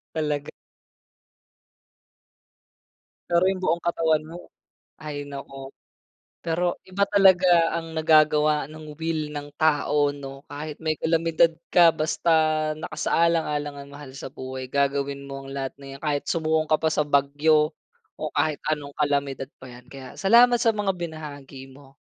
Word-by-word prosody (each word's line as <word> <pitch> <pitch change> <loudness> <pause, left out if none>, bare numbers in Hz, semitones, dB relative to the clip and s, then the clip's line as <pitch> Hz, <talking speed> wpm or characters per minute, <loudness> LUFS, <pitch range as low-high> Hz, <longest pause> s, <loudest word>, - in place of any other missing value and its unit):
Talag 150 -2 -2 2.8
Pero 175 +2 +3
yung 190 -1 0
buong 170 -1 +1
katawan 160 -2 0
mo 170 +2 -11 0.5
hay 145 -1 -6
naku. 135 -1 -8 0.7
Pero 175 +1 -1
iba 195 +2 +1
talaga 185 -4 +4
ang 165 -1 -5
nagagawa 155 -1 +3
nung 155 -1 -10
will 160 -1 -2
ng 145 0 -7
tao, 150 -2 +2
'no? 135 -1 -9
Kahit 150 +1 -7
may 155 -1 -1
kalamidad 165 +1 +2 0.2
ka 170 -2 +6
basta 160 +2 -1 0.4
nakasaalang-alang 155 -1 -1
ang 140 0 -11
mahal 145 -2 -10
sa 130 - -8
buhay, 130 0 -6
gagawin 140 0 -1
mo 135 0 -7
ang 135 - -9
lahat 135 -1 -4
na 140 0 -13
yan. - - -18
Kahit 145 -2 -1
sumuong 160 -1 0
ka 155 - +3
pa 160 - +2
sa 150 -1 +1
bagyo 150 +2 +2 0.4
o - - -5
kahit 155 -2 0
anong 145 -2 -5
kalamidad 140 -2 -1
pa 130 - -11
yan. 125 0 -13
Kaya, 135 -2 -10
salamat 240 +4 +5
sa 230 -1 +2
mga 205 -2 -1
binahagi 145 -5 -8
mo, 135 0 -18
150 Hz, 140 wpm, -24 LUFS, 140-165 Hz, 2.8 s, ka